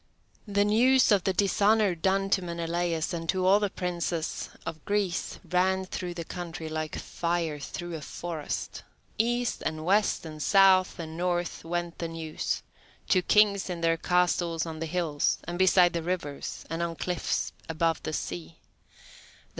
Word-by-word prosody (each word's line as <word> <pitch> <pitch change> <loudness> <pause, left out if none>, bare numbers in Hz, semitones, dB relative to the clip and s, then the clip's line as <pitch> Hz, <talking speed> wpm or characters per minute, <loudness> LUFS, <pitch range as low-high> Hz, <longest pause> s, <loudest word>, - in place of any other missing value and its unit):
The 205 0 +2
news 250 +4 +4
of 200 -3 +4
the 190 - +3
dishonour 200 +1 +3
done 195 +3 0
to 190 - +3
Menelaus 170 -1 -2
and 165 -1 -4
to 185 -1 +1
all 195 +2 +6
the 205 -1 0
princes 175 -3 -3 0.2
of 160 -2 -6
Greece 200 -3 -1
ran 190 +2 +2
through 180 -1 -5
the 170 - -4
country 170 -2 -6
like 155 0 -3
fire 170 -3 -2
through 175 +4 -6
a 160 - -5
forest. 165 0 -5 0.4
East 240 +2 +1
and 155 0 -3
west 200 -1 +2
and 155 -1 -7
south 190 +1 +5
and 160 -2 -6
north 175 0 -1
went 175 0 -3
the 170 - -2
news: 165 -1 -3 0.5
to 185 - +4
kings 200 +1 +4
in 175 -2 -4
their 165 0 +3
castles 175 -1 +1
on 160 -1 -6
the 165 - -3
hills, 160 -3 0
and 175 +1 -5
beside 180 -1 +5
the 170 - -1
rivers 165 -5 -4
and 165 +1 -3
on 170 -1 -2
cliffs 175 -2 -2 0.2
above 165 0 +1
the - - -4
sea. 85 - -5
175 Hz, 160 wpm, -28 LUFS, 165-190 Hz, 0.5 s, all